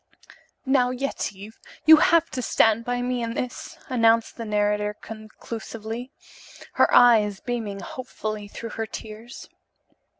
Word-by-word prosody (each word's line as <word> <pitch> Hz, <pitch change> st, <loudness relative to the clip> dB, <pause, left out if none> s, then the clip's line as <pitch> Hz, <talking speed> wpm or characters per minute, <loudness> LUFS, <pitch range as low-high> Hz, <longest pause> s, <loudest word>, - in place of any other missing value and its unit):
"Now, 260 Hz, -2 st, +3 dB
Yetive, 220 Hz, -5 st, -5 dB, 0.3 s
you 315 Hz, +1 st, +10 dB
have 335 Hz, 0 st, +4 dB
to 255 Hz, -, -3 dB
stand 225 Hz, -1 st, +3 dB
by 245 Hz, 0 st, -1 dB
me 250 Hz, 0 st, -1 dB
in 230 Hz, 0 st, -3 dB
this," 250 Hz, -1 st, -5 dB
announced 230 Hz, -4 st, +2 dB
the 230 Hz, -, -6 dB
narrator 210 Hz, 0 st, 0 dB
conclusively, 225 Hz, +2 st, -8 dB, 0.6 s
her -, -, +3 dB
eyes 215 Hz, -5 st, +5 dB
beaming 220 Hz, -5 st, -4 dB
hopefully 215 Hz, -5 st, -6 dB
through 230 Hz, +2 st, -8 dB
her 225 Hz, -1 st, -4 dB
tears. 220 Hz, +3 st, -9 dB
230 Hz, 125 wpm, -24 LUFS, 215-245 Hz, 0.6 s, you